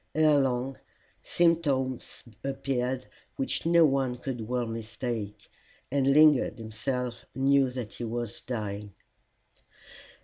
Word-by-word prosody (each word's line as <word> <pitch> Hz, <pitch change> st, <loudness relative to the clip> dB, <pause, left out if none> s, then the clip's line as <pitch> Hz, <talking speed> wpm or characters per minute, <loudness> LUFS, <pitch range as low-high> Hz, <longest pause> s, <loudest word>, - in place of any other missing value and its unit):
Ere 155 Hz, -2 st, +5 dB
long 130 Hz, 0 st, 0 dB, 0.4 s
symptoms 145 Hz, -7 st, 0 dB, 0.2 s
appeared 130 Hz, -2 st, -2 dB, 0.3 s
which 135 Hz, +4 st, -2 dB
no 170 Hz, -1 st, +6 dB
one 135 Hz, -3 st, +1 dB
could 125 Hz, -3 st, -5 dB
well 125 Hz, 0 st, 0 dB
mistake, 115 Hz, -2 st, -5 dB, 0.4 s
and 135 Hz, -1 st, +2 dB
Lingard 150 Hz, -1 st, +5 dB
himself 120 Hz, +2 st, -4 dB
knew 135 Hz, 0 st, +4 dB
that 125 Hz, -4 st, -6 dB
he -, -, -6 dB
was 120 Hz, -1 st, -4 dB
dying. 105 Hz, -4 st, -5 dB
130 Hz, 105 wpm, -28 LUFS, 120-135 Hz, 0.4 s, no